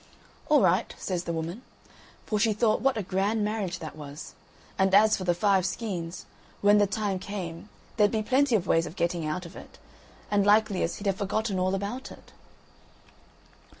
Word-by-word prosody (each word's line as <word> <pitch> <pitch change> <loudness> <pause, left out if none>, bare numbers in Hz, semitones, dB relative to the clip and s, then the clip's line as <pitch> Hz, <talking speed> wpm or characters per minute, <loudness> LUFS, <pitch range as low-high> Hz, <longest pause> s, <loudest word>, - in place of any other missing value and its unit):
"All 300 -3 +5
right," 185 0 +2
says 180 -2 -3
the 170 - -2
woman; 165 +6 -4 0.6
for 215 - -1
she 215 +1 +3
thought 215 +1 +1
what 265 -1 +2
a 215 - -1
grand 200 +4 0
marriage 205 -4 -2
that 160 -3 -8
was. 145 0 -9 0.5
And 190 0 +4
as 215 +1 +6
for 185 - -5
the 175 -1 +2
five 195 0 +3
skeins, 185 -3 -4 0.4
when 205 +1 +5
the 205 - +4
time 200 -1 -2
came, 185 -2 -6 0.3
there'd 210 -1 +5
be 215 0 -1
plenty 260 +1 +2
of 190 -4 +1
ways 165 0 +2
of 165 - -10
getting 170 -3 -1
out 180 +4 -3
of 170 - -11
it, - - -12 0.5
and 205 -1 +3
likeliest, 205 -4 +2
he'd 205 - -9
have 195 -1 +1
forgotten 205 -1 -1
all 185 +1 +1
about 205 +7 -5
it. - - -14
195 Hz, 185 wpm, -27 LUFS, 175-215 Hz, 0.6 s, as